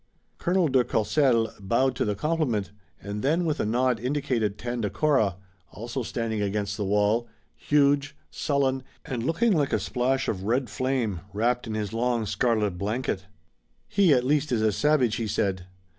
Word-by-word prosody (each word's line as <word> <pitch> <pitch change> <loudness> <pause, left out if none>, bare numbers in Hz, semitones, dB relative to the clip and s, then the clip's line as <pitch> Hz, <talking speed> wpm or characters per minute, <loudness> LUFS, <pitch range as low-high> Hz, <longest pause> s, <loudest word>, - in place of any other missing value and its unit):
Colonel 180 -1 +2
de 130 -3 +3
Courcelles 115 0 +2
bowed 120 +6 +1
to - - 0
the 105 -1 -1
compliment, 125 -7 -1 0.3
and 100 +1 -4
then 160 +6 +1
with 155 -2 -1
a - - 0
nod 125 +1 +1
indicated 125 -5 -1
Tandakora, 120 - 0 0.4
also 120 +4 -5
standing 115 -2 -2
against 100 0 -1
the 105 - -3
wall, 105 +4 +2 0.3
huge, 145 0 +2 0.2
sullen 135 -2 0 0.2
and 125 -3 -3
looking 200 - +2
like 145 -5 +1
a - - +3
splash 130 +2 0
of 95 -2 -2
red 120 +2 0
flame, 130 -8 -1
wrapped 120 +3 0
in 110 - -3
his 105 -1 -3
long 120 -1 0
scarlet 105 -4 0
blanket. 105 -2 -2 0.6
"He, 195 -4 +3
at 125 -3 +4
least, 145 +2 +1
is 115 -3 +1
a 110 - +3
savage," 130 -1 +2
he 115 - -2
said. 95 -3 -1
120 Hz, 160 wpm, -26 LUFS, 105-140 Hz, 0.6 s, at